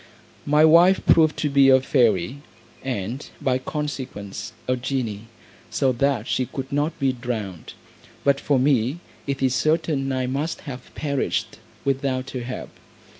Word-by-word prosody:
My 150 Hz, +2 st, +5 dB
wife 170 Hz, +4 st, +6 dB
proved 155 Hz, -2 st, +5 dB
to 150 Hz, -, 0 dB
be 140 Hz, -1 st, +5 dB
a 130 Hz, 0 st, +7 dB
fairy, 125 Hz, -, +1 dB, 0.4 s
and, 125 Hz, +1 st, -4 dB
by 130 Hz, -1 st, +1 dB
consequence, 130 Hz, -8 st, -5 dB, 0.2 s
a 130 Hz, -, +2 dB
genie, 120 Hz, -4 st, -3 dB, 0.4 s
so 135 Hz, -, +1 dB
that 130 Hz, -2 st, 0 dB
she 130 Hz, -, 0 dB
could 135 Hz, -1 st, -6 dB
not 145 Hz, +3 st, 0 dB
be 135 Hz, -3 st, +1 dB
drowned; 110 Hz, -9 st, -5 dB, 0.5 s
but 140 Hz, 0 st, +3 dB
for 140 Hz, -1 st, +1 dB
me, 130 Hz, +1 st, +2 dB, 0.3 s
it 140 Hz, -1 st, -2 dB
is 130 Hz, -1 st, +3 dB
certain 155 Hz, 0 st, +1 dB
I 130 Hz, -1 st, 0 dB
must 140 Hz, +6 st, -2 dB
have 130 Hz, -4 st, -8 dB
perished, 140 Hz, -3 st, -2 dB, 0.3 s
without 135 Hz, -1 st, -1 dB
her 130 Hz, -, -4 dB
help. 125 Hz, +1 st, -6 dB
135 Hz, 145 wpm, -23 LUFS, 125-145 Hz, 0.5 s, a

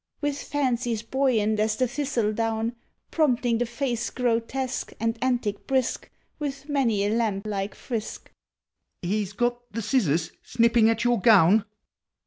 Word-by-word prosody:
With 290 Hz, -1 st, -2 dB
fancies 245 Hz, -5 st, -1 dB
buoyant 225 Hz, -4 st, +1 dB
as 215 Hz, 0 st, +1 dB
the 255 Hz, +3 st, +1 dB
thistledown, 230 Hz, -4 st, -1 dB, 0.4 s
Prompting 245 Hz, -7 st, +2 dB
the 245 Hz, -, 0 dB
face 240 Hz, -1 st, -2 dB
grotesque, 250 Hz, +2 st, -2 dB
and 225 Hz, 0 st, 0 dB
antic 240 Hz, -5 st, -1 dB
brisk, 260 Hz, -2 st, 0 dB, 0.3 s
With 280 Hz, -1 st, -5 dB
many 240 Hz, -9 st, +1 dB
a 205 Hz, -, +1 dB
lamb 215 Hz, -4 st, 0 dB
like 200 Hz, -1 st, -3 dB
frisk! 225 Hz, -4 st, -5 dB, 0.7 s
I -, -, -4 dB
He 210 Hz, +4 st, +1 dB
's 200 Hz, 0 st, -8 dB
got 240 Hz, +3 st, 0 dB
the 230 Hz, +1 st, -4 dB
scissors, 175 Hz, -, +1 dB
snipping 230 Hz, -1 st, +3 dB
at 225 Hz, 0 st, 0 dB
your 240 Hz, -4 st, +2 dB
gown 205 Hz, -2 st, +6 dB
230 Hz, 140 wpm, -26 LUFS, 215-255 Hz, 0.7 s, gown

